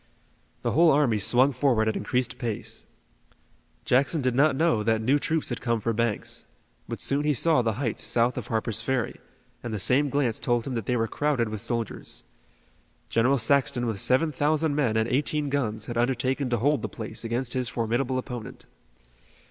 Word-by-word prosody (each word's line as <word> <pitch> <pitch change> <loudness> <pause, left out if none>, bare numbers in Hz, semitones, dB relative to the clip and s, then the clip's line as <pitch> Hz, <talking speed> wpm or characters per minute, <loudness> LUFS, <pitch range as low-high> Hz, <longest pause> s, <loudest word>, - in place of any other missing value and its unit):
The - - 0
whole 165 +2 +5
army 140 -7 +3
swung 125 +6 +4
forward 125 -4 +2
at 110 - 0
increased 125 -1 -1
pace. 115 -4 -3 1.0
Jackson 140 +5 +2
did 130 -3 0
not 140 +2 +3
know 160 -2 +2
what 110 +1 +1
new 130 +6 +2
troops 160 +1 -1
had 120 - -4
come 115 -2 0
for 115 +2 -1
Banks, 115 -1 -2 0.4
but - - -5
soon 140 +1 +1
he 150 -1 +1
saw 160 0 +3
the 115 -2 0
heights 125 -5 -2
south 120 +1 +1
of 125 - -5
Harper's 110 -1 -1
Ferry, 125 0 -2 0.4
and 120 - -5
the 110 - -2
same 135 +8 +3
glance 130 -5 0
told 120 -2 0
him 135 - -4
that 115 -4 -4
they 125 - +1
were 115 0 0
crowded 135 -2 0
with 110 -1 -5
soldiers. 115 -1 -3 0.9
General 125 +4 +3
Saxton 125 0 +2
with 110 -4 -2
seven 145 +9 +2
thousand 150 +2 +1
men 130 -7 +1
and 110 0 +1
eighteen 145 +3 0
guns 110 -6 -2
had 120 -1 -3
undertaken 130 +2 0
to 120 - +1
hold 145 +6 +1
the - - -4
place 110 -1 -6
against 120 +2 -1
his 125 -2 -1
formidable 120 +3 -1
opponent. 125 -3 -7
125 Hz, 185 wpm, -26 LUFS, 115-140 Hz, 1.0 s, whole